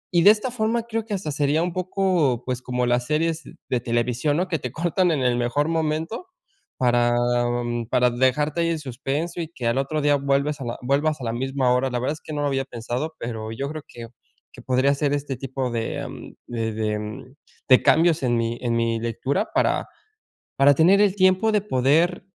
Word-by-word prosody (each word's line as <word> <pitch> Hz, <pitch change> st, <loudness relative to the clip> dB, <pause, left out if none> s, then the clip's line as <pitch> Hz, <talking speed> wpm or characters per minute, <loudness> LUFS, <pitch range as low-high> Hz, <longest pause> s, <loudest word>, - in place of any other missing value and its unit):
y 170 Hz, -, +5 dB
de -, -, +9 dB
esta 220 Hz, +4 st, -1 dB
forma, 230 Hz, 0 st, 0 dB
creo 225 Hz, -1 st, -3 dB
que 220 Hz, -, -5 dB
hasta 180 Hz, -6 st, -4 dB
sería 145 Hz, +2 st, +1 dB
un 175 Hz, -1 st, -2 dB
poco, 180 Hz, -9 st, 0 dB
pues, 125 Hz, 0 st, -3 dB
como 125 Hz, -1 st, -1 dB
las 120 Hz, 0 st, +1 dB
series 160 Hz, +1 st, 0 dB, 0.3 s
de 125 Hz, -, +1 dB
televisión, 120 Hz, +5 st, 0 dB
¿no?, 180 Hz, -, 0 dB
que 165 Hz, -3 st, -1 dB
te 125 Hz, -2 st, -5 dB
cortan 175 Hz, +5 st, +1 dB
en 145 Hz, -, 0 dB
el 125 Hz, -1 st, +2 dB
mejor 125 Hz, +5 st, 0 dB
momento 160 Hz, -, -2 dB, 0.5 s
para 120 Hz, -1 st, +2 dB, 0.7 s
para 125 Hz, 0 st, +3 dB
dejarte 145 Hz, +6 st, +1 dB
ahí 170 Hz, -, +1 dB
en 165 Hz, -1 st, -1 dB
suspenso 145 Hz, +5 st, -4 dB
y 160 Hz, -, -5 dB
que 130 Hz, -8 st, -7 dB
al 115 Hz, +2 st, +1 dB
otro 150 Hz, +3 st, -1 dB
día 145 Hz, 0 st, +3 dB
vuelves 140 Hz, +1 st, 0 dB
a -, -, -4 dB
la 120 Hz, -, -4 dB
vuelvas 140 Hz, +3 st, 0 dB
a -, -, -4 dB
la 115 Hz, -, -2 dB
misma 130 Hz, +1 st, 0 dB
hora, 130 Hz, +1 st, +1 dB
la 125 Hz, -, -1 dB
verdad 130 Hz, +4 st, -1 dB
es 155 Hz, -, -11 dB
que 155 Hz, -, -8 dB
no 145 Hz, -, -2 dB
lo 145 Hz, -, +1 dB
había 135 Hz, -1 st, -1 dB
pensado, 125 Hz, +6 st, -4 dB
pero 110 Hz, -2 st, -5 dB
yo 135 Hz, +5 st, -4 dB
creo 155 Hz, -1 st, -6 dB
que 120 Hz, -1 st, -9 dB, 0.5 s
que -, -, -11 dB
podría 130 Hz, +2 st, +2 dB
hacer 145 Hz, 0 st, 0 dB
este 145 Hz, -1 st, -2 dB
tipo 130 Hz, -1 st, -3 dB
de 115 Hz, -1 st, -3 dB, 0.4 s
de 115 Hz, -2 st, -3 dB
de 110 Hz, +3 st, -4 dB, 0.3 s
de 130 Hz, -, +9 dB
cambios 165 Hz, 0 st, +4 dB
en 120 Hz, -2 st, +2 dB
mi 115 Hz, 0 st, -1 dB
en 120 Hz, -2 st, 0 dB
mi 115 Hz, -1 st, 0 dB
lectura 130 Hz, -, -2 dB
para -, -, +1 dB, 0.7 s
para 140 Hz, +1 st, +6 dB
tener 180 Hz, +7 st, +5 dB
el 205 Hz, -2 st, +3 dB
tiempo 185 Hz, +3 st, +4 dB
de 210 Hz, -2 st, +2 dB
poder, 165 Hz, +3 st, +2 dB
140 Hz, 205 wpm, -23 LUFS, 125-165 Hz, 0.7 s, de